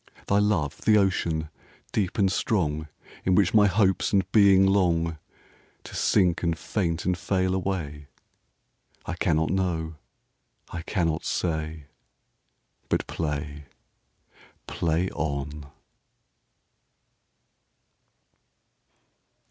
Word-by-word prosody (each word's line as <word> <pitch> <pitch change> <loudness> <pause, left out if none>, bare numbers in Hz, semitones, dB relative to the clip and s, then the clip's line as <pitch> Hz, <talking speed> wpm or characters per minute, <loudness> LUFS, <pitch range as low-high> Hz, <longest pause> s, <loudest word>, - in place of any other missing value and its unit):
Thy 100 - +2
love 100 -9 0
the 110 -1 +4
ocean, 85 -6 0 0.4
deep 95 -4 -1
and 95 -3 +3
strong, 80 -8 0 0.4
In 95 - +2
which 100 -1 +3
my 105 -2 +6
hopes 95 -1 +2
and 100 -2 +3
being 100 -3 +6
longTo 85 -4 +2 0.8
sink 90 -4 +2
and 85 -2 0
faint 85 -5 -2
and 90 - +2
fail 95 0 0
away?I 80 -7 -7
cannot 80 0 +1
know. 85 -4 -1 0.7
I 85 - -4
cannot 85 -3 -1
say. 80 -3 -2 1.0
But - - 0
play, 75 -2 -4 1.0
play 85 +2 -1
on. 70 -1 -4
85 Hz, 90 wpm, -26 LUFS, 80-95 Hz, 1.0 s, my